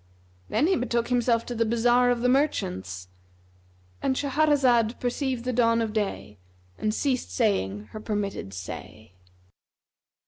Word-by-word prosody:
Then 295 - +2
he 375 +3 +3
betook 240 -4 -1
himself 240 -2 +2
to 245 - -5
the 230 -1 +1
bazar 240 +2 +3
of 245 -1 +1
the 250 - +2
merchants,—And 90 - -3
Shahrazad 270 -5 +2
perceived 250 0 -2
the 255 - -1
dawn 230 -1 +3
of 225 -2 -1
day 195 - -3 0.4
and 215 - -1
ceased 255 - -1
saying 95 +2 0
her 215 - -7
permitted 205 - -3
say. 95 +2 -9
230 Hz, 130 wpm, -26 LUFS, -, 0.4 s, he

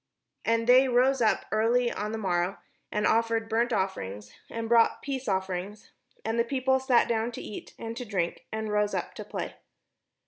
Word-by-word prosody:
And 230 0 +1
they 255 +2 +6
rose 255 +1 +3
up 220 - +2
early 235 +3 +2
on 210 +1 -3
the 225 - -3
morrow, 180 -2 0 0.3
and 210 0 0
offered 225 0 +2
burnt 230 +2 +1
offerings, 105 - -3 0.2
and 230 0 -4
brought 230 0 +4
peace 270 -2 -4
offerings; 190 +1 -3 0.3
and 225 +1 0
the - - +5
people 265 +1 +1
sat 260 -2 +3
down 230 +1 0
to - - -6
eat 210 - -8
and 230 0 -6
to 250 - -4
drink, 190 -7 -3
and 220 -1 -3
rose 210 0 +1
up - - -3
to - - -7
play. - - -5
225 Hz, 180 wpm, -28 LUFS, 205-240 Hz, 0.3 s, they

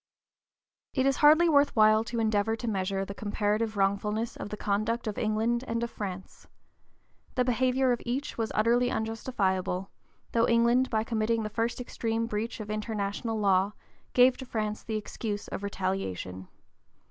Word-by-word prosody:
It 260 -1 +2
is 275 0 +2
hardly 310 +3 +6
worth 285 -3 +4
while 215 0 +5
to 235 0 -3
endeavor 220 0 +1
to 235 +1 -6
measure 195 -2 -1
the 200 - -6
comparative 210 +1 -1
wrongfulness 210 +3 0
of - - -6
the 210 - -5
conduct 215 +4 -1
of 215 -2 -3
England 225 +3 0
and 230 +1 -1
of 235 - -3
France. 190 -2 -7 0.9
The 250 -1 +2
behavior 255 +1 +2
of 240 - 0
each 255 +4 -3
was 225 -1 -2
utterly 240 +3 +3
unjustifiable; 195 -5 -1 0.4
though 230 0 +3
England 235 +2 +3
by 220 -1 +1
committing 225 0 0
the 215 - -3
first 230 +3 -1
extreme 230 -2 -2
breach 225 +1 -3
of 210 -1 -5
international 215 +1 -2
law 195 0 +3 0.4
gave 250 0 +6
to 260 - -7
France 215 -3 -2
the 220 -1 -3
excuse 210 0 -4
of - - -5
retaliation. 185 - -3
220 Hz, 160 wpm, -29 LUFS, 205-235 Hz, 0.9 s, hardly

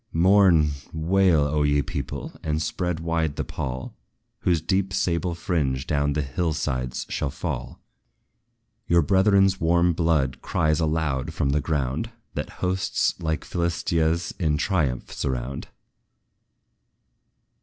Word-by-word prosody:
Mourn, 85 -3 +5 0.2
wail, 85 0 +3
O 75 +1 +1
ye 75 -1 +2
people! 70 -5 -5
and 75 0 -1
spread 85 +1 -2
wide 80 -3 -1
the - - -2
pall, 65 -1 -5 0.5
Whose 85 -3 +2
deep 95 +4 0
sable 85 -1 0
fringe 75 -8 -1
down 75 -1 +1
the 75 0 0
hill 80 +4 -1
sides 65 -4 -2
shall 70 - -2
fall! 65 -5 -5 1.1
Your 85 -1 +4
brethren's 95 +2 +3
warm 85 +1 +3
blood 75 -6 +1
cries 75 0 +1
aloud 75 -5 -1
from 70 - +1
the 75 +1 +1
ground, 70 - -1 0.2
That - - -4 0.2
hosts, 90 0 +1
like 80 -2 -2
Philistia's, 85 -1 0
in 75 -4 +1
triumph 75 -8 -1
surround. 65 +1 -3
80 Hz, 125 wpm, -25 LUFS, 70-85 Hz, 1.1 s, Mourn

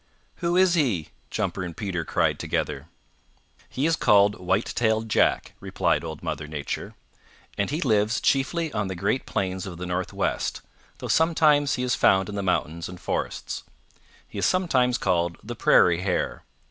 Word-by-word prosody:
"Who 175 -1 0
is 185 -1 +5
he?" 120 - +1 0.2
Jumper - - -2
and 85 -3 -6
Peter 95 -5 -2
cried - - 0
together. - - -2 0.8
"He 135 - -2
is 165 0 +3
called 105 -7 +4
White 95 +4 0
tailed 110 -1 +1
Jack," - - +2
replied - - 0
Old 80 -2 -7
Mother 75 0 -4
Nature. 75 -2 -5 0.6
"And 100 - -1
he 150 +5 -2
lives 110 -3 +2
chiefly 155 +4 0
on 105 -2 -1
the 95 - -4
great 100 +9 -1
plains 95 0 -2
of 85 -3 -7
the 90 - -5
Northwest, 90 +1 -2 0.4
though - - -6
sometimes 155 -3 +3
he 125 - -3
is 125 -1 +1
found 95 0 +3
in 105 - -5
the 100 - -2
mountains 85 -3 -1
and 90 -1 -9
forests. - - -3 0.7
He - - -7
is - - +1
sometimes 130 -10 +2
called 85 -2 0
the - - -6
Prairie 85 -1 +4
Hare. 95 -1 -2
100 Hz, 165 wpm, -25 LUFS, 90-135 Hz, 0.8 s, is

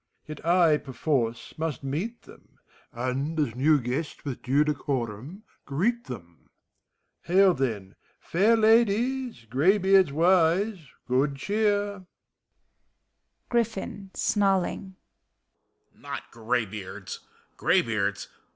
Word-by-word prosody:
Yet 155 -1 -9
I, 170 -3 +4
perforce, 130 -4 -2
must 160 -3 -3
meet 175 - -4
them. - - -18 0.3
And 130 +6 -2
as 140 -7 0
new 145 +5 +3
guest 135 +7 -4
with 135 -4 -5
due 140 +4 +2
decorum 140 - -3 0.2
greet 220 - 0
them. 85 -9 -10 0.4
— - - -52
Hail, 190 +2 +5
then. 110 - -3 0.3
Fair 210 +7 +2
Ladies! 230 - +2
Graybeards 190 - +4
wise, 175 +3 +2 0.2
good 135 +3 +1
cheer. 205 +2 -1 1.4
GBIFFIK 205 -4 -2
{snarling). 195 -1 0 1.0
Not - - -7
graybeards! 105 -4 -4 0.4
Graybeards? 100 -3 +1
155 Hz, 95 wpm, -26 LUFS, 125-195 Hz, 1.4 s, Hail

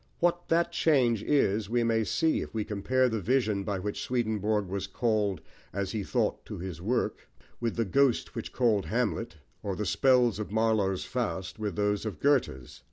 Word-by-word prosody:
What 175 0 +1
that 170 +1 +2
change 125 -9 +3
is 110 -7 +1
we 120 +1 +2
may 115 -1 +2
see 160 +8 +1
if - - -7
we 110 - 0
compare 125 +6 +1
the 110 -3 -2
vision 110 -3 +1
by 100 -1 -2
which 100 +2 -4
Swedenborg 110 -4 0
was 95 +1 -4
"called," 105 -7 0 0.3
as 100 -1 -3
he 110 - -2
thought, - - -1
to - - -6
his 85 -2 -6
work, 115 +7 -1 0.3
with 115 -2 -1
the 115 - 0
ghost 135 +5 +2
which 115 - -5
called 115 -6 +1
Hamlet, 115 -3 -1 0.3
or 100 -2 -3
the 105 - -3
spells 125 -5 +3
of 105 - -5
Marlowe's 110 -4 +1
Faust 105 -5 -3
with 105 -5 -3
those 105 +1 0
of 100 -7 -6
Goethe's. 130 - 0
110 Hz, 180 wpm, -29 LUFS, 100-125 Hz, 0.3 s, change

